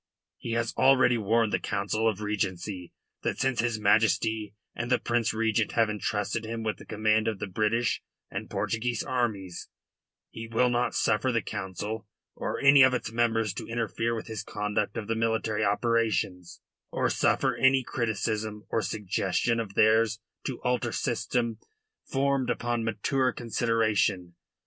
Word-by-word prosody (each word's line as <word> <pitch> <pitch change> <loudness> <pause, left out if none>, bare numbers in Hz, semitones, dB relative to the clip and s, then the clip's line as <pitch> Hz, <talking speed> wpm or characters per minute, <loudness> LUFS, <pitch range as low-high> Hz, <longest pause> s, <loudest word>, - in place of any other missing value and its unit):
He 115 - -4
has 115 0 -1
already 130 -3 +5
warned 110 +1 +2
the - - +2
Council 105 +3 0
of 105 -1 -4
Regency 95 -3 -3 0.3
that, - - -2
since 135 -2 0
his 115 -1 0
Majesty 105 0 +2 0.2
and 120 +1 -4
the 125 - +4
Prince 120 -2 0
Regent 110 -1 0
have 115 -2 +3
entrusted 105 +1 -2
him 115 0 -4
with 110 -1 -2
the - - -14
command 110 0 +1
of 110 -2 -1
the 105 - -4
British 110 +4 0 0.3
and - - -6
Portuguese 120 0 -1
armies, 110 -8 -2 0.6
he 115 0 -7
will 120 +2 +2
not 120 0 0
suffer 120 +5 +2
the 115 -2 0
Council 105 +2 -5 0.3
or - - -3
any 140 0 +7
of 130 -1 +6
its 120 - -3
members 115 -3 +1
to - - -6
interfere 115 0 -1
with 110 - -5
his 110 -2 -5
conduct 105 0 -2
of 110 -2 -4
the 115 - 0
military 110 -1 0
operations, 105 -4 0 0.3
or - - 0
suffer - - +2
any 130 0 +4
criticism 110 -2 -2
or 115 - +1
suggestion 105 +3 0
of 105 -3 -5
theirs 110 0 +4 0.3
to 130 - -4
alter 125 -2 0
system 115 -3 -1 0.5
formed 135 -1 +1
upon 120 -1 -1
mature 125 +4 0
consideration. 110 -6 0
110 Hz, 155 wpm, -28 LUFS, 105-120 Hz, 0.6 s, any